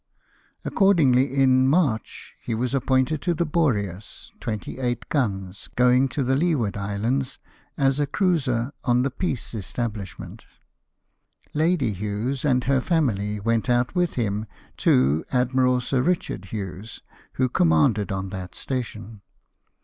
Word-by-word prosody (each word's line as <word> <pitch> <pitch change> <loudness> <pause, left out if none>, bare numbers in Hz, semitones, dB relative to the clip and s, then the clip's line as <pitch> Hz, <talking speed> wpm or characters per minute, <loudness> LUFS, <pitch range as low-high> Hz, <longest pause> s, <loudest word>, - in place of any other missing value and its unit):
Accordingly, 140 -10 +3
in 130 -1 +4
March, 140 -7 0
he 115 - -3
was 125 +3 -2
appointed 130 +2 +1
to 175 -2 0
the 170 - 0
Boreas, 105 - -2
28 120 +2 -3
guns, 100 -9 -2
going 125 +2 +4
to 140 - -1
the 130 +1 +1
Leeward 140 - +1
Islands, 110 +7 -2 0.4
as 135 0 +2
a 145 - +1
cruiser, 140 - 0
on 125 0 +2
the 135 - -1
peace 135 - -3
establishment. 105 0 -5 1.1
Lady 155 -7 +1
Hughes 105 +7 -3
and 130 -4 +2
her 135 0 +2
family 105 - 0
went 115 +3 0
out 120 0 +2
with 180 -2 0
him 110 -2 -1 0.3
to 70 +5 +3
Admiral 125 0 +2
Sir 125 +1 0
Kichard 160 - -1
Hughes, 100 +1 -7 0.3
who 130 - +1
commanded 100 +2 +2
on 95 0 -3
that 95 -2 -7
station. 115 -5 -5
125 Hz, 125 wpm, -24 LUFS, 105-135 Hz, 1.1 s, in